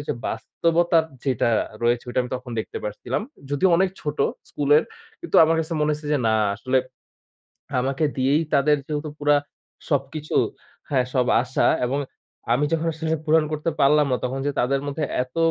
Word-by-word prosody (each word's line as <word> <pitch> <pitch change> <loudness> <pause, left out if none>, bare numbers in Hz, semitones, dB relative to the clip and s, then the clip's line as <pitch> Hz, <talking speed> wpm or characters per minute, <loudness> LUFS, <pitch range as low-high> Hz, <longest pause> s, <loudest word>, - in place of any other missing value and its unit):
ওইযে 145 - -3
বাস্তবতার 165 +7 +1 0.2
যেটা 130 -4 +1 0.3
রয়েছে 120 0 +2
ওইটা 125 - +1
আমি 125 - -7
তখন 125 0 -10
দেখতে - - -6
পাচ্ছিলাম। 120 - -3 0.3
যদিও 145 +7 +3
অনেক 190 +2 +3
ছোট 150 0 -4 0.3
স্কুলের 145 +2 +3 0.4
কিন্তু 345 - -1
আমার 165 +1 +2
কাছে 160 +1 -4
মনে 150 0 +2
হইছে 150 0 -5
যে 145 - +3
না 110 - +3 0.2
আসলে 130 +4 -1 1.0
আমাকে 135 +4 0
দিয়েই 135 +4 +2
তাদের 150 +2 +4
যেহেতু 150 0 -3
পুরা 145 0 +4 0.5
সবকিছু, 145 +2 -2 0.6
হ্যাঁ, 130 -3 +2
সব 125 -2 +2 0.2
আশা 130 +1 0 0.2
এবং 135 +3 -1 0.5
আমি 140 +4 +2
যখন 165 0 0
আসলে 160 0 -1
পূরণ 160 0 +4
করতে 155 +2 -1
পারলাম 150 +1 +5
না - - +3
তখন 130 +2 -2
যে - - +2
তাদের 135 +3 +1
মধ্যে 145 +2 -2 0.2
এত 125 +3 -11
145 Hz, 165 wpm, -23 LUFS, 130-155 Hz, 1.0 s, পারলাম